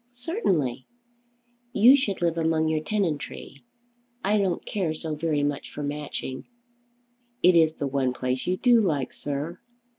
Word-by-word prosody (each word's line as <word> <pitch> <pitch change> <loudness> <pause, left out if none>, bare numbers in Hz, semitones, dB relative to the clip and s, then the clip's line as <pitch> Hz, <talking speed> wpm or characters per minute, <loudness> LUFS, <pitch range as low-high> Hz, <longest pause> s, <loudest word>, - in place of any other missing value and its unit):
"Certainly." 190 - -1 0.9
"You 245 +6 +7
should 205 -10 -1
live 170 -1 +2
among 160 -1 +1
your 155 0 +1
tenantry. 155 -8 -3 0.6
I 205 +2 +2
don't 190 -3 -1
care 180 -6 -2
so 155 0 -4
very 150 -1 0
much 145 -1 -2
for 145 - -6
Matching." 145 -2 -5 1.0
"It 180 0 +6
is 160 -1 +4
the 145 - -3
one 135 -2 0
place 125 +1 -3
you 185 +1 +1
do 240 0 +5
like, 150 -10 -1
sir." 145 +4 -4
160 Hz, 145 wpm, -26 LUFS, 145-190 Hz, 1.0 s, You